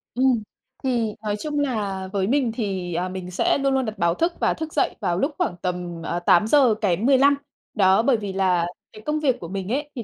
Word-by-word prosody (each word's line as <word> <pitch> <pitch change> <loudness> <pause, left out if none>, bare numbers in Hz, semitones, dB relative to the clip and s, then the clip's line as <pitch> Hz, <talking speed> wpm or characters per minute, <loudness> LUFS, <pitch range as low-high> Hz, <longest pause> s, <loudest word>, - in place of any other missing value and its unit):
Ừm, 250 -3 +2 0.4
thì 235 -5 0
nói 210 -1 -1
chung 295 +4 -2
là 205 -9 -2
với 195 -1 0
mình 260 -1 +1
thì, 195 -6 -3
à, 180 +2 -1
mình 185 -1 -6
sẽ 180 - +2
luôn 275 -1 +1
luôn 265 -1 +1
đặt 215 -1 -5
báo 170 0 +2
thức 335 - 0
và - - +2
thức 320 -1 -6
dậy - - +1
vào 175 -5 0
lúc 275 - 0
khoảng 175 - -1
tầm 175 -2 -4 0.2
8:00 225 +5 +5
kém 200 +1 +1
15 275 +1 +5 0.4
đó. 190 0 +4
Bởi 240 +1 +3
vì 205 -3 -5
là 185 -3 +2 0.3
cái 215 - -11
công 300 0 0
việc 270 -5 +1
của 170 - -7
mình 190 +1 -5
ấy, 290 +3 -1
thì 240 - -4
215 Hz, 220 wpm, -23 LUFS, 185-265 Hz, 0.4 s, 8:00